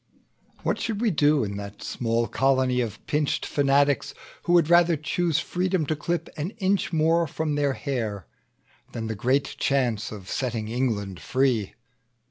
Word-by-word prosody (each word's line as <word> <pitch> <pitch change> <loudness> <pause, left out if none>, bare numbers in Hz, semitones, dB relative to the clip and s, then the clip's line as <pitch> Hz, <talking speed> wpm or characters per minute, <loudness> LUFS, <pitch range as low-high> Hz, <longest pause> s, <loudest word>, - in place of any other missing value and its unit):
"What - - 0
should 220 -3 -2
we 230 -2 +2
do 150 -3 +3
in 100 -1 -4
that 100 0 -8
small 115 -1 -1
colony 130 -2 +2
Of 110 -3 -5
pinched 150 -1 0
fanatics, 140 -1 +2 0.3
who 175 - +2
would 170 -3 +5
rather 170 -1 +5
choose 160 +1 0
Freedom 180 0 0
to 155 - -1
clip 170 +2 -2
an 160 +8 -3
inch 195 -3 +1
more 165 +1 +2
from 155 +1 -2
their 145 -1 +1
hair, 110 - -3 0.7
Than 115 -1 -4
the 110 - -2
great 130 +7 0
chance 120 -6 0
of 100 -4 -9
setting 115 -3 -2
England 110 -7 -2
free? 130 -6 0
140 Hz, 155 wpm, -25 LUFS, 115-160 Hz, 0.7 s, would